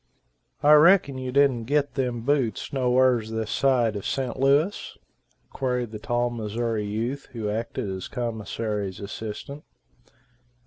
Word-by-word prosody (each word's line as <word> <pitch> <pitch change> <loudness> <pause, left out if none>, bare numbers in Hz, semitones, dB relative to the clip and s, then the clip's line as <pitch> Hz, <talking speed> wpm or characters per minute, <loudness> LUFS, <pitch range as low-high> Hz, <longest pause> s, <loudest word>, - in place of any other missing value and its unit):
"I 150 +1 +7
reckon 150 -3 +5
you 130 0 -4
didn't 130 -4 +3
git 145 +2 +1
them 125 -3 -2
boots 135 -2 -1
no 130 -2 +1
wher's 125 -3 +3
this 110 -1 -3
side 125 -5 +2
o' 100 - -3
Sent 130 +4 -3
Louis?" 145 +8 +1 0.5
queried 125 -3 -2
the 105 - -7
tall 120 +2 0
Missouri 110 -1 -2
youth 115 +7 -3
who 110 -3 -3
acted 115 +1 -3
as 95 -1 -5
commissary's 110 -4 -3
assistant. 110 +8 -7
120 Hz, 135 wpm, -25 LUFS, 110-135 Hz, 0.5 s, I